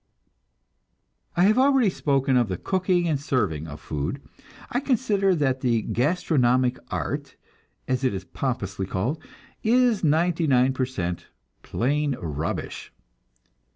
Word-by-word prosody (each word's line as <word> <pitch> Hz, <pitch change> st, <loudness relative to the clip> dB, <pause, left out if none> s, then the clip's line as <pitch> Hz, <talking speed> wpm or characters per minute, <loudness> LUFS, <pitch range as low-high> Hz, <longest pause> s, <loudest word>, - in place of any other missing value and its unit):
I 175 Hz, -, +5 dB
have 215 Hz, +5 st, +4 dB
already 265 Hz, -6 st, +4 dB
spoken 135 Hz, -5 st, +1 dB
of 120 Hz, -3 st, +3 dB
the 95 Hz, -2 st, -3 dB
cooking 185 Hz, -, 0 dB
and 150 Hz, -4 st, 0 dB
serving 80 Hz, -, -1 dB
of 75 Hz, -1 st, -8 dB
food. 75 Hz, -, -4 dB, 0.5 s
I 245 Hz, -, +1 dB
consider 215 Hz, -8 st, +1 dB
that 135 Hz, -4 st, 0 dB
the 115 Hz, -4 st, +1 dB
"gastronomic 130 Hz, -3 st, +1 dB
art," -, -, -4 dB, 0.5 s
as 130 Hz, 0 st, -1 dB
it 130 Hz, -, +2 dB
is 95 Hz, -1 st, -4 dB
pompously 100 Hz, -5 st, -3 dB
called, 115 Hz, -, -2 dB, 0.4 s
is 240 Hz, -2 st, +3 dB
ninety 165 Hz, +2 st, +2 dB
nine 130 Hz, -1 st, +4 dB
per 130 Hz, -1 st, -1 dB
cent 90 Hz, -9 st, -4 dB, 0.3 s
plain 145 Hz, +3 st, 0 dB
rubbish. 80 Hz, -1 st, -4 dB
135 Hz, 125 wpm, -25 LUFS, 120-180 Hz, 0.5 s, I